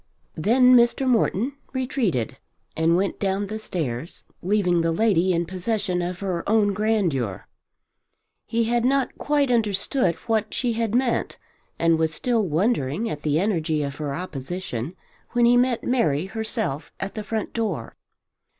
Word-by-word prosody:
Then 250 +9 +5 0.3
Morton 245 -1 +2 0.2
retreated 250 - -1 0.4
and 165 +1 +3
went 195 +1 -1
down 195 0 0
the 215 +2 -5
stairs, 160 - -4 0.2
leaving 180 -2 +2
the 165 0 +1
lady 185 -1 +2
in 170 -1 +1
possession 185 0 -2
of 180 +1 -4
her 185 -4 -2
own 210 -2 +3
grandeur. 180 - 0 1.0
He 230 0 +1
had 235 +1 +1
not 270 +1 +1
quite 290 -3 +1
understood 210 - +1
what 220 -2 0
she 245 -2 0
had 225 -1 -1
meant, 250 -1 0 0.4
and 165 -1 +3
was 160 -1 +1
still 230 -5 +1
wondering 175 - 0
at 150 - -5
the 150 +1 +1
energy 165 -6 0
of 140 0 -5
her 145 -2 -3
opposition 165 -3 -5 0.4
when 240 -1 +4
he 240 +1 +5
met 245 -1 +2
Mary 165 - +1
herself 210 - -3
at 195 0 -4
the 215 - -5
front 220 0 -3
door. 200 - -3
200 Hz, 145 wpm, -24 LUFS, 165-230 Hz, 1.0 s, Then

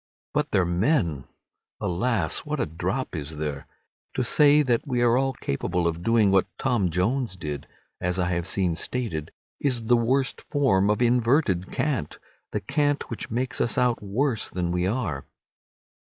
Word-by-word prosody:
But - - 0
their 95 - +2
men! 85 - +1 0.5
Alas, 95 +4 0
what 150 0 -4
a - - +1
drop 80 +1 -3
is 75 0 -5
there! 75 -2 -4 0.5
To - - +1
say 150 0 +5
that 120 0 0
we 125 -3 0
are 120 0 +4
all 135 +1 +1
capable 85 - -1
of 85 0 -2
doing 110 0 +3
what 95 -1 +3
Tom 120 -9 +1
Jones 100 +6 0
did—as 85 +3 -5
I 90 -1 +1
have 85 0 -1
seen 90 -4 +1
stated—is 120 - -3
the 120 +2 +4
worst 130 +3 0
form 115 -9 +3
of 105 +3 +2
inverted 120 - +2
cant, 130 - -2 0.3
the - - -2
cant 145 - 0
which 115 - -5
makes 125 +3 -1
us 120 - +1
out 125 -2 +2
worse 110 +4 -1
than 90 -1 -2
we 90 +1 0
are. 95 - -2
110 Hz, 155 wpm, -25 LUFS, 85-125 Hz, 0.5 s, say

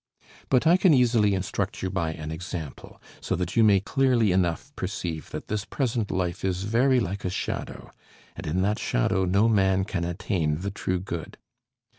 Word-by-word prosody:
But 130 +1 +3
I 170 +3 +6
can 185 -5 +5
easily 115 -5 +3
instruct 95 +2 -3
you 95 - -1
by 85 -5 -1
an 80 -1 -6
example, 80 -3 -7 0.2
so - - -2
that 90 0 -3
you 115 - +5
may 100 -3 +6
clearly 120 0 +2
enough 95 +10 0
perceive 90 -4 -4
that - - -7
this 105 -1 -2
present 115 -4 -2
life 90 -1 -2
is 95 -1 -1
very 125 +5 +3
like 100 -2 -3
a 90 - -1
shadow, 90 - -5 0.4
and 85 0 -7
in 90 +5 0
that 105 +2 0
shadow 95 +10 +1
no 100 +5 +3
man 95 -3 +3
can 95 -4 -3
attain 85 -2 -1
the 100 +1 -3
true 95 -2 -2
good. 85 -3 -6
95 Hz, 180 wpm, -26 LUFS, 90-110 Hz, 0.4 s, I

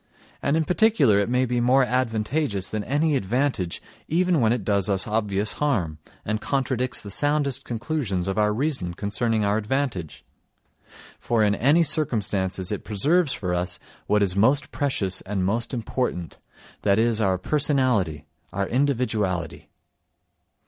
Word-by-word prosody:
And 145 +3 +1
in 160 - +1
particular 175 - +3
it 100 - 0
may 125 +1 +2
be 120 -1 -1
more 130 +3 +4
advantageous 120 -2 -1
than 110 -1 -2
any 150 +2 +1
advantage 120 -5 -1 0.2
even 175 -1 +2
when 110 -1 +3
it 120 -3 -1
does 100 0 +1
us 95 -2 +1
obvious 105 -1 -1
harm, 95 - 0 0.3
and 110 0 -2
contradicts 130 -2 -1
the 100 - -8
soundest 145 +1 0
conclusions 115 - -2
of 95 - -1
our 105 0 +3
reason 115 - -2
concerning 110 +2 0
our 100 +1 +2
advantage—for 115 - -5
in 105 -1 +3
any 145 - +3
circumstances 105 - 0
it 105 - -3
preserves 145 - +1
for 90 -3 -3
us 90 +1 0 0.3
what 105 -1 +3
is 95 -2 +1
most 130 +8 +2
precious 100 -10 -1
and 95 -1 -2
most 115 +5 -1
important—that 105 -4 -3
is, 115 0 +2
our 95 -3 +2
personality, 125 - 0 0.3
our 100 +2 -1
individuality. 110 - -1
110 Hz, 140 wpm, -24 LUFS, 100-135 Hz, 0.3 s, more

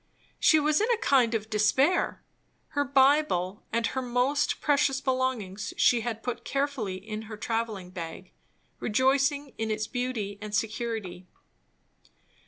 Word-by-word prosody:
She 315 - +5
was 305 +4 +2
in 440 - +1
a 475 - +3
kind 255 - +3
of 215 -1 -2
despair. 220 - +2 0.5
Her 285 - 0
Bible 270 -9 +2
and 230 0 +1
most 255 +3 +1
precious 280 -2 +2
belongings 255 -8 -2
she 240 -1 +4
had 225 -1 -4
put 245 -1 -4
carefully 275 -8 -2
in 215 +3 -6
her 215 - -7
travelling 220 -5 -3
bag, 165 -3 -7 0.5
rejoicing 270 +4 +1
in 225 0 -1
its 215 0 -1
beauty 225 -5 -3
and 210 0 -4
security. 215 -5 -3
235 Hz, 130 wpm, -28 LUFS, 215-275 Hz, 0.5 s, She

